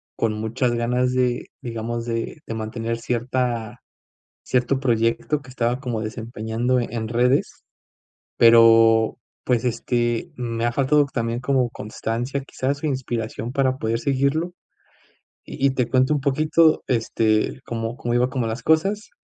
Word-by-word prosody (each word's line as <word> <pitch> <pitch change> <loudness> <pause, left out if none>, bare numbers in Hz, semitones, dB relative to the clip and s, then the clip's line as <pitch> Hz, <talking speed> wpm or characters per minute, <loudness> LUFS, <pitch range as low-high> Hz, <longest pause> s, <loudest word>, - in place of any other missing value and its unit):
con 115 -2 0
muchas 110 +4 -1
ganas 125 +2 0
de 125 -1 0
digamos 115 0 -4
de 115 +3 -3
de - - -5
mantener 115 +1 -3
cierta 120 -1 -2 0.6
cierto 125 +1 +1
proyecto 120 +3 0
que 130 - -15
estaba 125 0 -1
como 120 -5 -3
desempeñando 115 +2 -2
en 115 -2 -3
redes, 125 +4 +1 0.8
pero 115 -1 +6 0.3
pues, 125 -1 +1
este, 120 +4 -1
me 115 -2 -3
ha 120 - 0
faltado 145 +3 +3
también 115 -1 -1
como 130 -2 +1
constancia 120 +4 -4
quizás 140 +1 -3
o - - -1
inspiración 120 -4 -3
para 130 -1 +1
poder 115 -1 -1
seguirlo 140 +6 0 0.9
y 135 - -1
y - - +4
te 125 -3 -1
cuento 130 +3 +3
un 145 - 0
poquito, 155 +3 +3
este, 115 -1 +1
cómo 115 0 -4
cómo 120 -1 -2
iba 125 +1 +3
como 130 -4 -1
las 115 +1 -4
cosas. 195 - +1
120 Hz, 140 wpm, -23 LUFS, 115-130 Hz, 0.9 s, pero